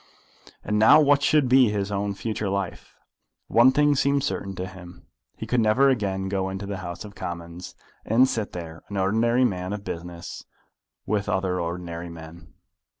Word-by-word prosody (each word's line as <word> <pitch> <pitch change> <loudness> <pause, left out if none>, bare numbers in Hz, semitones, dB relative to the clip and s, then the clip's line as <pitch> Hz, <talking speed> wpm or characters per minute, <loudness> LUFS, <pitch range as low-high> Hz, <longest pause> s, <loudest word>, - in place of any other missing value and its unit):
And 105 0 0
now 110 +8 +7
what 145 -1 +4
should 145 -1 +3
be 125 -2 +5
his 100 -1 -2
own 100 0 -2
future 105 0 -3
life? 100 -2 -4 0.5
One 120 +3 +5
thing 145 +1 +3
seemed 140 0 +1
certain 100 -8 -3
to 90 - -4
him. 90 -2 -12 0.3
He - - -6
could 125 - +1
never 115 +5 +4
again 95 -6 -1
go 95 -1 -1
into 95 +1 -5
the 100 -1 -4
House 90 +2 -7
of 105 - -11
Commons, 85 -1 -7 0.3
and 120 +4 +4
sit 110 -5 -3
there, 80 -2 -7
an 100 - -5
ordinary 115 +6 +2
man 90 -3 -2
of 105 -1 -6
business, 85 -3 -7 0.6
with 105 -1 -1
other 95 -2 0
ordinary 85 0 -5
men. 80 0 -12
100 Hz, 170 wpm, -25 LUFS, 90-115 Hz, 0.6 s, now